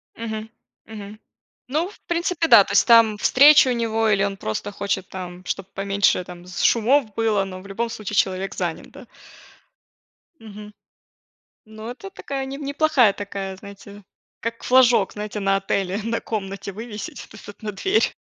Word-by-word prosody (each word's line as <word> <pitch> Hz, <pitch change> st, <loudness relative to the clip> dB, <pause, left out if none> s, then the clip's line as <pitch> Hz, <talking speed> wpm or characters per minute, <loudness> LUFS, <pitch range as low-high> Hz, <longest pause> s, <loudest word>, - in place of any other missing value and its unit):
Мгм, 220 Hz, -1 st, -6 dB, 0.4 s
мгм. 210 Hz, -1 st, -10 dB, 0.5 s
Ну, 310 Hz, +7 st, -1 dB
в -, -, -17 dB
принципе, 340 Hz, -1 st, 0 dB
да, 225 Hz, -7 st, +8 dB
то -, -, -6 dB
есть -, -, +5 dB
там 230 Hz, -3 st, +6 dB
встреча 280 Hz, +3 st, +6 dB
у -, -, +2 dB
него, 225 Hz, -1 st, 0 dB
или 195 Hz, -1 st, +2 dB
он 200 Hz, -1 st, -2 dB
просто 110 Hz, -, -4 dB
хочет 200 Hz, -1 st, -3 dB
там, 180 Hz, -1 st, -8 dB
чтоб 195 Hz, -, -3 dB
поменьше 195 Hz, -1 st, +1 dB
там 175 Hz, 0 st, -12 dB
с 180 Hz, -, -5 dB
шумов 230 Hz, -1 st, +3 dB
было, 220 Hz, -3 st, +1 dB
но 185 Hz, -1 st, -8 dB
в 200 Hz, -, -13 dB
любом 230 Hz, +4 st, -3 dB
случае 210 Hz, -2 st, -6 dB
человек 190 Hz, 0 st, 0 dB
занят, 175 Hz, -3 st, -4 dB
да. 275 Hz, -2 st, -13 dB, 1.4 s
Мгм. 210 Hz, -1 st, -11 dB, 0.9 s
Но 220 Hz, +2 st, -9 dB
это 390 Hz, +10 st, -9 dB
такая, 275 Hz, -7 st, -5 dB
не 270 Hz, +1 st, -6 dB
неплохая 285 Hz, -6 st, +2 dB
такая, 195 Hz, -1 st, -6 dB
знаете, 200 Hz, +1 st, -12 dB, 0.4 s
как 230 Hz, +1 st, -5 dB
флажок, 245 Hz, -5 st, +4 dB
знаете, 210 Hz, 0 st, -5 dB
на 195 Hz, 0 st, +2 dB
отеле, 195 Hz, 0 st, -2 dB
на 230 Hz, 0 st, -2 dB
комнате 200 Hz, -2 st, -5 dB
вывесить 215 Hz, 0 st, -8 dB
то -, -, -14 dB
есть 210 Hz, -, -13 dB
вот 205 Hz, -, -12 dB
на 210 Hz, -1 st, -4 dB
дверь. 385 Hz, -, +1 dB
210 Hz, 165 wpm, -22 LUFS, 195-235 Hz, 1.4 s, да